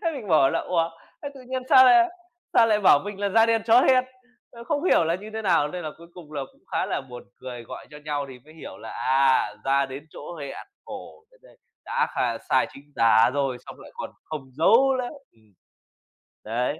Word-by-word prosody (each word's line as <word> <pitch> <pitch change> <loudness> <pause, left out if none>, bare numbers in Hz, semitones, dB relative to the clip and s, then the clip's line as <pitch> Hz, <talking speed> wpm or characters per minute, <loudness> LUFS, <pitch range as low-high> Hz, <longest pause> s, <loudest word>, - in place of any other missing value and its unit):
Thế 330 - 0
mình 240 -8 -7
bảo 145 -5 +4
là - - 0
"Ủa, 170 -2 0 0.3
thế 285 - -4
tự 270 - -12
nhiên 260 0 -3
sao 260 -1 +8
lại 355 +5 +6 0.5
sao 230 - +6
lại 210 -2 +2
bảo 185 -7 +6
mình 205 -1 -7
là 200 - +1
"Da 225 +3 +4
đen 225 -1 +1
chó 230 +2 +6
hen." 255 -1 +4 0.5
Ơ, 235 0 -11
không 295 +4 -2
hiểu 270 - +4
là 165 +1 0
như 205 +4 -7
thế 220 - -3
nào?" 165 -7 +2
Nên 180 +3 -6
là 155 - -4
cuối 170 - -14
cùng 165 -4 -13
là 145 -2 -3
cũng - - -29
khá - - 0
là - - -2
buồn 125 -2 -11 0.2
cười, 125 -2 -7
gọi - - -10
cho 150 - -11
nhau 145 -2 -2
thì 130 -2 -11
mới 155 +1 -17
hiểu 160 - -10
là 110 - -9
"À, 130 -5 +2
ra 140 0 +2
đến 135 +3 -9
chỗ 170 +4 -9
hẹn", 140 -1 -7 0.2
khổ - - -10
thật - - -24
đấy, - - -20 0.3
đã 475 0 0
kh - - -1
sai - - +3
chính 145 +1 -16
tả 115 0 +5
rồi, 135 -3 -1
xong - - -11
lại - - -13
còn - - -6
không 155 -2 -6
dấu 255 - +4
nữa. 250 -1 -2 0.2
Ừm. 110 -2 -28 0.9
Đấy. 125 +7 -2
165 Hz, 230 wpm, -24 LUFS, 135-230 Hz, 0.9 s, sao